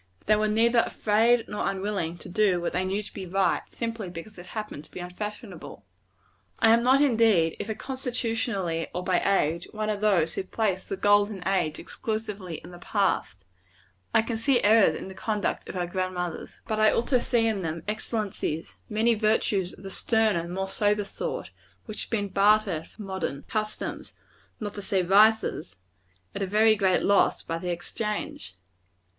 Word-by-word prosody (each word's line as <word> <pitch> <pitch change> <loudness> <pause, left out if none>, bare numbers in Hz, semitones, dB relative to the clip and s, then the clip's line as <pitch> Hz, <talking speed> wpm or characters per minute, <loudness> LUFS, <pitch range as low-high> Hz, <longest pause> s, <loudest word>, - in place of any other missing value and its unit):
They 215 - +5
were 215 0 +1
neither 230 +3 +3
afraid 225 +3 +2
nor 210 - -1
unwilling 190 -4 -2
to - - -10
do 190 -1 +2
what 175 - -2
they 180 - 0
knew 195 +3 -1
to - - -11
be 190 -2 -6
right, 190 +1 +1
simply 230 -4 -4
because 180 +5 -9
it 175 - -11
happened 210 -9 -6
to - - -22
be - - -9
unfashionable. 180 - -7 0.7
I 225 - +5
am 230 - +4
not, 260 +3 +4
indeed, 220 - +3
either 220 +1 -3
constitutionally 230 -10 -2
or 180 - -2
by 180 -1 +2
age, 170 -3 +1
one 215 0 -1
of 205 -1 -3
those 180 -7 +3
who - - -2
place 190 -1 -1
the 195 - -4
golden 205 -2 +2
age 180 -6 +1
exclusively 210 -5 -4
in 175 - -11
the 175 - -11
past. 180 - -1 0.7
I - - +4
can 225 0 -3
see 245 +2 +2
errors 215 0 +5
in - - -6
the 190 - -8
conduct 210 +1 -2
of - - -6
our 180 -1 -1
grand 185 +1 -2
mothers. 175 -2 -4
But 215 -1 -1
I 215 0 +6
also 245 +2 +2
see 235 -1 +1
in 220 -3 0
them 165 -1 -4
excellencies; 210 -7 -3
many 225 +2 +3
virtues 215 -4 +1
of - - -14
the 195 - -7
sterner, 215 -6 +1
more 190 +2 -3
sober 205 +1 +1
sort, 145 - -5 0.3
which 215 - -6
have - - -21
been 205 -3 -1
bartered 200 -4 +3
for 215 - -11
modern 190 -8 -4
customs 215 -1 -4 0.4
not 205 -2 -4
to 205 - -6
say 190 -1 0
vices 205 - +3 0.6
at - - -5
a 195 - 0
very 215 +3 +4
great 190 -3 +2
loss 200 0 +3
by 165 0 -3
the 180 - -4
exchange. 175 - -4
205 Hz, 180 wpm, -27 LUFS, 180-220 Hz, 0.7 s, I